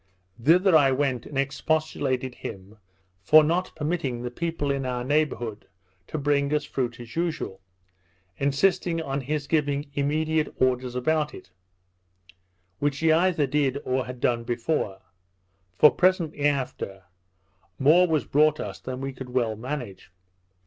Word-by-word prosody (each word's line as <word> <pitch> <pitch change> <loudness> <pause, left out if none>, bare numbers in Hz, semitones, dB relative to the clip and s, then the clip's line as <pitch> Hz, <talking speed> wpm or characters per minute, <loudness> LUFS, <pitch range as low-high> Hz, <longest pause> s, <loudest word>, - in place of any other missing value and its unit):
Thither 180 - +5
I 140 -3 +6
went, 130 -3 -1
and 145 - -6
expostulated 135 -2 -1
with - - -20
him 100 +3 -9 0.4
for 155 - +7
not 175 +4 0
permitting 150 -6 -2
the 125 - -4
people 160 0 -2
in 135 -1 -1
our 125 -1 -2
neighbourhood 125 -6 -1 0.4
to - - -4
bring 140 -1 +1
us 150 0 -1
fruit 120 -3 -3
as 120 -1 -10
usual, 165 - -3 0.8
insisting 165 +4 +1
on 140 -3 -3
his 145 +2 -2
giving 145 -1 -1
immediate 155 +2 0
orders 125 -1 +1
about 150 +4 0
it; 90 - -13 1.3
which 145 -1 0
he 160 0 +3
either 165 -2 +3
did 140 -1 0
or 130 0 -1
had 125 -1 -7
done 120 -1 +1
before. 115 -4 -2 0.7
For 150 - +8
presently 170 -5 +2
after, 130 -9 -3 0.7
more 160 +7 +5
was 155 -3 0
brought 155 +1 +3
us - - -5
than 130 0 -6
we 135 0 -4
could 130 -1 -9
well 120 -3 0
manage. 115 -6 -6
140 Hz, 140 wpm, -25 LUFS, 125-155 Hz, 1.3 s, For